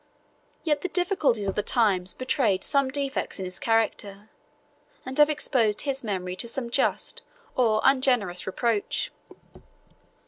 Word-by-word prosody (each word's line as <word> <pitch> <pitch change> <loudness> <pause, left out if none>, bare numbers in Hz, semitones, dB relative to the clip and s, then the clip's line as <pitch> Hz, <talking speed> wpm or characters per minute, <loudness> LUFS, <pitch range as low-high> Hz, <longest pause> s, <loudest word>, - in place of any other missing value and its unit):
Yet 295 -3 +1
the - - -1
difficulties 340 - +1
of 195 - 0
the 210 - 0
times 195 -6 +2
betrayed 240 -7 +1
some 275 -2 +2
defects 275 0 -3
in 190 - -4
his 185 0 -7
character; 215 -2 -1 0.8
and 260 +1 -6
have 295 0 +7
exposed 245 -8 +1
his 270 -2 -2
memory 185 -4 -3
to 235 - -4
some 235 0 -4
just - - 0 0.3
or 225 -4 +3
ungenerous 250 -10 +2
reproach. 210 +2 -1
235 Hz, 135 wpm, -26 LUFS, 200-270 Hz, 0.8 s, have